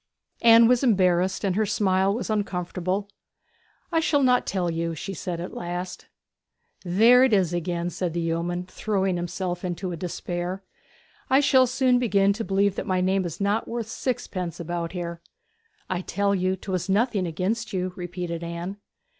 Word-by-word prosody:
Anne 230 0 +8
was 245 0 +4
embarrassed, 185 -5 +2
and 190 -3 +1
her 215 - +2
smile 195 -2 +2
was 230 +4 -3
uncomfortable. 190 -1 -2 0.8
'I 330 - +3
shall 295 -3 +2
not 250 -1 +3
tell 185 -3 -1
you,' 165 0 -2
she 195 +5 -5
said 175 -1 -4
at 175 - -6
last. 175 +1 -5 0.8
'There 225 +8 +6
it 260 -4 +3
is 185 -4 +2
again!' 175 0 -2
said 175 -1 -3
the 170 - -1
yeoman, 170 +2 -2
throwing 190 0 -1
himself 175 +1 -3
into 180 +1 -3
a - - -3
despair. 175 +2 -4 0.7
'I 265 - +5
shall 260 -2 +5
soon 250 0 +2
begin 200 -4 +3
to 225 +3 -4
believe 200 -1 +2
that - - -3
my 185 -1 +1
name 190 +1 +1
is 170 - -5
not 205 +2 0
worth 235 -1 -3
sixpence 185 - -3
about 170 0 -4
here!' 170 -2 -5 0.7
'I 185 -1 -2
tell 200 +1 0
you 185 0 +1
'twas 185 -1 -4
nothing 205 -2 +1
against 195 +8 -2
you,' 185 -1 -2
repeated 175 -1 -5
Anne. 170 +3 -5
185 Hz, 165 wpm, -25 LUFS, 175-210 Hz, 0.8 s, Anne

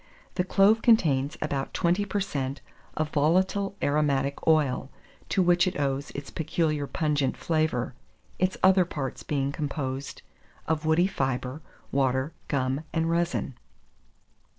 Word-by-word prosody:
The 180 - 0
clove 200 +4 +4
contains 150 - +3
about 140 -3 -3
20 180 +3 +2
per 205 +1 -1
cent. 140 -8 -3 0.4
of 155 -1 0
volatile 190 +6 +2
aromatic 140 -1 0
oil, 145 -5 +2 0.4
to 190 - +2
which 175 +1 +4
it 180 - -2
owes 140 0 -1
its 140 0 -6
peculiar 155 -3 -1
pungent 145 -4 0
flavour, 155 -7 0 0.5
its 185 0 +1
other 190 0 +6
parts 145 -6 -5
being 140 -2 -1
composed 140 -2 -4 0.4
of 155 0 -1
woody 160 +3 +4
fibre, 135 -5 -2 0.3
water, 130 +2 +1
gum, 135 0 0
and 165 0 0
resin. 170 -4 0
150 Hz, 125 wpm, -27 LUFS, 135-175 Hz, 0.5 s, other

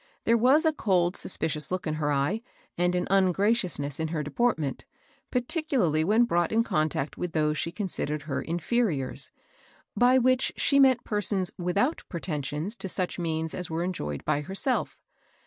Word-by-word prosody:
There 230 - +4
was 260 +8 +4
a 315 - +3
cold, 185 - +1
suspicions 155 -4 -2
look 185 0 -3
in 155 - -1
her 150 -1 -1
eye, 145 +10 0 0.3
and 180 +1 +1
an 180 - 0
ungraciousness 185 - +1
in 160 - 0
her 155 -1 -2
deportment, 155 - -1 0.5
particularly 250 - +1
when 215 +7 +4
brought 175 -7 +1
in 225 +1 +3
contact 155 - -1
with 180 -1 -3
those 150 -1 +1
she 165 - -2
called 170 -6 -3
her 150 -2 -3
"inferiors," 170 - -1 0.7
by 245 +4 +5
which 255 +1 +2
she 280 - +3
meant 260 -3 +5
persons 200 -3 0
without 200 - 0
pretensions 155 - -3
to 190 - -4
such 180 0 -2
means 160 -1 -2
as 180 -2 -4
were 165 +1 -2
enjoyed 75 - -4
by 145 - +1
herself. 195 - -1
180 Hz, 160 wpm, -27 LUFS, 155-225 Hz, 0.7 s, by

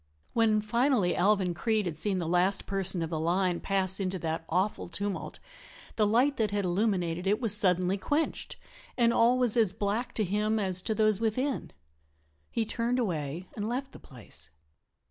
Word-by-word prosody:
When, 220 -2 +3
finally, 235 -3 +1
Alvan 190 -1 +2
Creede 215 +4 0
had 170 -3 -3
seen 195 +5 -1
the 170 -3 -2
last 180 +3 +2
person 190 -3 -1
of 165 - -5
the 160 - -1
line 175 +2 +1
pass 190 -1 0
into 190 -1 -2
that 160 -1 -3
awful 185 +2 -1
tumult 200 +2 -4 0.6
the 210 -2 +2
light 255 +7 +2
that 220 -2 +1
had 205 -1 -1
illuminated 180 -2 0
it 210 +3 +2
was 225 -5 +3
suddenly 185 -1 +2
quenched 295 +11 -2 0.4
and 235 -1 +3
all 240 +2 +4
was 245 -4 +2
as 220 -6 +3
black 210 +4 -2
to 215 - +1
him 210 +3 0
as 190 -3 0
to 220 +3 -2
those 215 -2 +3
within. 255 +5 -1 0.8
He 230 - -1
turned 235 +3 -1
away 170 - -2
and 210 0 -3
left 265 +3 -3
the - - -12
place. 90 - -8
200 Hz, 175 wpm, -29 LUFS, 180-225 Hz, 0.8 s, all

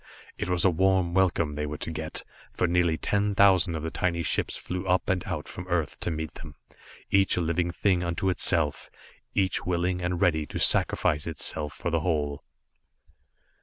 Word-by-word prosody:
It - - -4
was 90 0 +1
a 95 - +5
warm 95 0 +2
welcome 85 -5 +2
they 75 0 -3
were 75 +1 -5
to 80 - -4
get, 80 0 -5 0.3
for - - 0
nearly 85 -1 +2
ten 100 +2 0
thousand 95 -4 +4
of 80 - -4
the 80 - -3
tiny 85 -2 -1
ships - - 0
flew 90 +1 -5
up 90 +1 +2
and 90 -2 -1
out 85 -5 -4
from 90 0 -8
Earth 85 -4 -1
to - - -2
meet 80 -1 -4
them, 75 -2 -11 0.6
each 95 -1 +3
a - - +2
living 85 +1 0
thing 90 0 +1
unto 85 +2 -2
itself, 80 -5 +1 0.5
each 95 -2 +1
willing 90 0 -1
and 90 0 -1
ready 80 -4 +2
to - - -6
sacrifice 75 +1 +2
itself 75 -2 -2
for 85 +6 -4
the 85 - +2
whole. 75 -4 -1
85 Hz, 185 wpm, -27 LUFS, 80-90 Hz, 0.6 s, a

